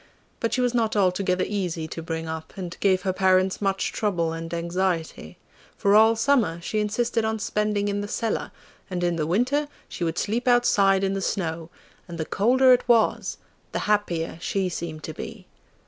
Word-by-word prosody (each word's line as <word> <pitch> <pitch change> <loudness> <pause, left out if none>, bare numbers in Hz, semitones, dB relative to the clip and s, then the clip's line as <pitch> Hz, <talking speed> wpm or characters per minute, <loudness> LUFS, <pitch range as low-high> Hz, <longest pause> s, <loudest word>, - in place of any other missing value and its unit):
But 230 - -1
she 255 - +1
was 245 -1 +1
not 225 -3 +1
altogether 185 -1 +1
easy 175 -6 -2
to 165 - -6
bring 165 0 -4
up, 160 0 -6
and 180 -2 -5
gave 190 -2 +2
her 190 -2 0
parents 185 0 +2
much 195 -1 0
trouble 175 -7 -1
and 165 0 -6
anxiety, 170 - -2 0.4
for 200 - +2
all 220 +2 +6
summer 225 -8 +2
she 215 +5 -2
insisted 230 +2 0
on 220 0 0
spending 210 -1 -1
in 205 0 -1
the 205 - -4
cellar, 225 +2 -2 0.4
and 180 -2 -3
in 175 -1 +1
the 155 -2 -1
winter 255 - +1 0.2
she - - -5
would 165 0 -1
sleep 235 +5 -1
outside 200 -6 +4
in 195 0 +1
the 195 - -2
snow, 165 -4 -2 0.4
and 170 -1 -7
the 160 - -2
colder 255 +8 +4
it 250 - +1
was 230 -2 +2 0.4
the - - -1
happier 175 -6 0
she 190 0 -1
seemed 160 -3 -6
to - - -5
be. - - -8
195 Hz, 185 wpm, -25 LUFS, 170-220 Hz, 0.4 s, all